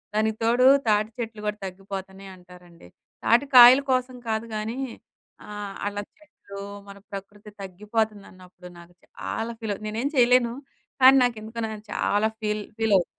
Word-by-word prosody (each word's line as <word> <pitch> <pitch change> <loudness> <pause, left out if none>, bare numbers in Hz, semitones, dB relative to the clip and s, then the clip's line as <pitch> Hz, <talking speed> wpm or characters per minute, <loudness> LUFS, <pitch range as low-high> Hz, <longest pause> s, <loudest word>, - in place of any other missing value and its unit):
దానికి 220 0 0
తోడు 240 +3 +3 0.2
తాటి 210 0 +2
చెట్లు 225 -2 -5
గూడా 210 0 -2
తగ్గిపోతున్నాయి 190 0 -8
అంటారండి. 180 - -17 0.4
తాటికాయల 250 +1 +7
కోసం 255 0 0
కాదు 220 +1 -1
గానీ, 220 +4 -4 0.7
ఆహ్, 205 -1 -7
అలా 205 0 -3 0.2
చెట్లు 295 -10 -13 0.3
మన 200 0 -11
ప్రకృతి 205 +2 -10
తగ్గిపోతుందన్నప్పుడు 195 -2 -5
నాకు 170 +1 -16
చాలా 225 +1 -5
ఫీల్ 220 -2 -3
అవు 215 - -13
నేనేం 230 +6 -2
చేయలేను 245 -1 +4 0.5
కానీ 265 +1 +9
నాకెందుకు 230 -1 -3
నేను 215 -1 -8
చాలా 205 +2 +1
ఫీల్, 210 0 -2
ఫీల్ 225 -2 +1
అవు 175 - +1
215 Hz, 135 wpm, -25 LUFS, 195-230 Hz, 0.7 s, కానీ